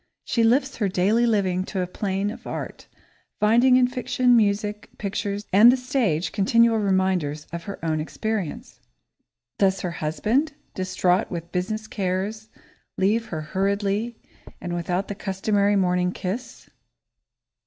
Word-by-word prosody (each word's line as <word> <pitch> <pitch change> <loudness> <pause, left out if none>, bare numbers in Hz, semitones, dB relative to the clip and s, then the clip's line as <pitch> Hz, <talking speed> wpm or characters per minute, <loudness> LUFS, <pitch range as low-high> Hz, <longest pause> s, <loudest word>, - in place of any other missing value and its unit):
She 230 - 0
lifts 265 +4 +2
her 205 -4 0
daily 205 +6 +2
living 190 -5 +1
to 195 -2 -3
a - - 0
plane 195 +2 -2
of - - -10
art, - - -6 0.5
finding 235 +5 +5
in 255 0 +5
fiction, 250 0 +2
music, 210 -1 0
pictures, 205 0 -3
and 220 +5 +8
the 260 - +1
stage 240 - 0
continual 230 +3 +3
reminders 185 -7 0
of 170 0 -5
her 200 - -6
own 155 -1 0
experience. 205 +1 -4 0.8
Does 195 -1 +2
her 180 - -2
husband, 210 - 0 0.2
distraught 185 -1 0
with 170 -1 -6
business 215 +4 -2
cares, 205 +2 -3 0.5
leave 215 +4 +1
her 160 -3 -4
hurriedly 200 +6 -1 0.4
and 175 -1 -5
without 175 +3 -2
the - - -4
customary 200 +1 0
morning 180 -1 +2
kiss? 200 +7 -5
200 Hz, 135 wpm, -24 LUFS, 185-220 Hz, 0.8 s, and